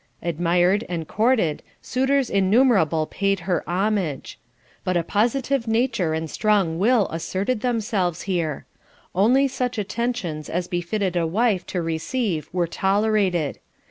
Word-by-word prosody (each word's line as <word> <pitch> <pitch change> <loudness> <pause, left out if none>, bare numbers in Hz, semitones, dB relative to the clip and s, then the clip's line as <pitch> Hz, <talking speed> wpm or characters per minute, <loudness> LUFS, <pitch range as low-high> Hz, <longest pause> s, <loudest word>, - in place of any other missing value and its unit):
Admired 175 +4 +2
and 165 -3 -3
courted, 215 - +1 0.2
suitors 265 +1 +1
innumerable 195 - +3
paid 195 +2 -1
her 175 -2 -1
homage. 185 -6 -1 0.4
But 185 -1 0
a 170 - 0
positive 240 +6 0
nature 225 -8 +1
and 160 0 -3
strong 190 -3 +1
will 225 +1 +3
asserted 195 +8 -2
themselves 215 -8 -1
here. 170 -6 -2 0.5
Only 245 +9 +4
such 250 -2 -3
attentions 210 -7 -3
as 175 +1 -2
befitted 180 +2 -2
a 170 -2 +1
wife 200 +1 +1
to 180 -2 -2
receive 165 - -2
were 180 -1 +1
tolerated. 190 -3 +1
195 Hz, 125 wpm, -23 LUFS, 170-225 Hz, 0.5 s, Only